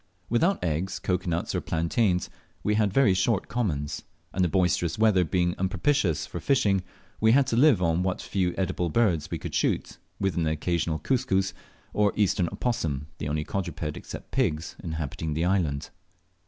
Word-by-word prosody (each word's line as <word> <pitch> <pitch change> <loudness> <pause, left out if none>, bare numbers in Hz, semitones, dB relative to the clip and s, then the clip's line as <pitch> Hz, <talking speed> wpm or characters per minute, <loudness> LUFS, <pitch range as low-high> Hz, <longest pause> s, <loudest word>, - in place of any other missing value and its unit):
Without 170 - +2
eggs, 85 +3 -1
cocoa 90 0 -1
nuts, 85 +6 -1
or 90 - 0
plantains, 90 +3 +1 0.4
we 105 - +2
had 105 -2 +2
very 105 -3 +4
short 95 +2 +1
commons, 75 -12 -2 0.3
and 95 - +1
the - - +4
boisterous 90 -2 +1
weather 105 -4 +4
being 85 +1 +1
unpropitious 95 - +1
for - - -6
fishing, 100 -8 +2 0.4
we 110 +1 +5
had 140 +1 +5
to 120 - -1
live 125 -7 +5
on 85 +1 +2
what 95 0 -1
few 90 -3 -1
eatable 90 -2 0
birds 90 -6 +1
we - - -2
could - - -7
shoot, - - 0 0.2
with 95 -2 0
an 80 -2 +1
occasional 80 +1 0
cuscus, 95 - 0 0.4
or 105 -1 +2
eastern 95 -4 +2
opossum, 75 - -2
the 75 - -3
only 75 +1 -1
quadruped, 80 -5 -3
except - - -9
pigs, 85 - 0
inhabiting 80 -1 -3
the 80 +2 +1
island. 80 -6 0
90 Hz, 170 wpm, -27 LUFS, 80-105 Hz, 0.4 s, we